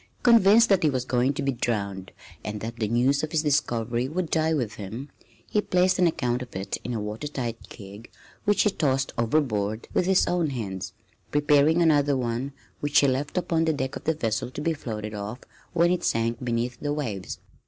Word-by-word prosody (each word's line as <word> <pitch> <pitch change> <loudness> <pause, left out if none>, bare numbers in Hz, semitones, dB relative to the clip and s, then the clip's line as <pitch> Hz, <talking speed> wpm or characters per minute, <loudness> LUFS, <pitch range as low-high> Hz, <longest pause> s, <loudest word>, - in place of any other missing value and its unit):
Convinced 230 -1 +6
that 195 -2 +4
he 155 - +3
was 130 -2 -1
going 125 +1 +2
to 145 0 -3
be 140 - +1
drowned 100 -6 -3 0.3
and 105 0 -4
that 115 +2 -6
the 110 -2 -1
news 125 +5 +2
of 155 - -4
his 160 -1 +1
discovery 120 -5 0
would 170 +3 -3
die 160 0 +2
with 125 -9 -1
him, 110 +8 -7 0.4
he 210 - +1
placed 185 -1 +2
an 180 - +5
account 125 -6 -1
of 125 - -9
it 95 +1 -3
in 125 - -3
a - - -1
water 105 +7 -4
tight 120 -5 -4
keg 100 +1 -11 0.3
which 205 0 +3
he 210 - +3
tossed 135 -6 0
overboard 110 -4 0
with 180 - +1
his 190 -1 +4
own 175 -3 0
hands, 100 -8 -5 0.4
preparing 150 +3 +4
another 145 -3 +3
one 125 +2 -2 0.3
which 145 0 +3
he 140 - +4
left 135 +6 -1
upon 165 -2 +1
the 160 - +2
deck 130 -2 -3
of - - -8
the 160 - +1
vessel 115 -4 -1
to 130 - -8
be 165 +2 0
floated 110 -7 -5
off 105 +3 -5 0.4
when 175 0 +3
it 180 - 0
sank 115 +2 0
beneath 120 0 -2
the 145 - -2
waves. 110 -11 -4
130 Hz, 205 wpm, -26 LUFS, 115-155 Hz, 0.4 s, Convinced